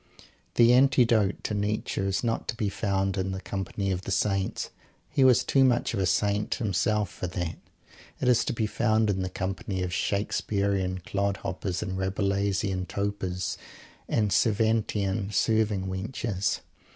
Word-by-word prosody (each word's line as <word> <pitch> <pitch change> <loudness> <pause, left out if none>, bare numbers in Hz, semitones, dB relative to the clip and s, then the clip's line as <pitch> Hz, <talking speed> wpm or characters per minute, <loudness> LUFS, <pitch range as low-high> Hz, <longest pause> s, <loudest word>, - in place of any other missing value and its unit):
The 120 0 +6
antidote 120 -6 +4
to - - -2
Nietzsche 105 0 -1
is 95 +2 0
not 115 -1 -1
to - - -2
be 105 -3 -1
found 95 -1 -1
in 95 0 -1
the 95 - -4
company 100 0 -3
of 90 -1 -1
the - - -7
Saints. 95 -1 0 0.4
He 135 - +3
was 130 -2 +6
too 135 - +3
much 125 -3 +2
of 105 - -1
a 95 - +2
Saint 105 +2 +1
himself 105 -1 0
for 90 - -5
that. 90 -2 -4 0.6
It 130 - -1
is 125 -2 +4
to - - -1
be 110 -1 0
found 110 -1 +2
in 95 -1 -2
the 95 - -2
company 95 +1 -3
of 90 -1 -3
Shakespearean 100 -2 0
clodhoppers, 95 -2 -2
and 95 +1 -4
Rabelaisian 100 0 0
topers, 100 -3 -3 0.5
and 105 -3 +1
Cervantian 105 -2 +1
serving 110 -3 +1
wenches. 100 +1 -2
100 Hz, 150 wpm, -27 LUFS, 95-110 Hz, 0.6 s, The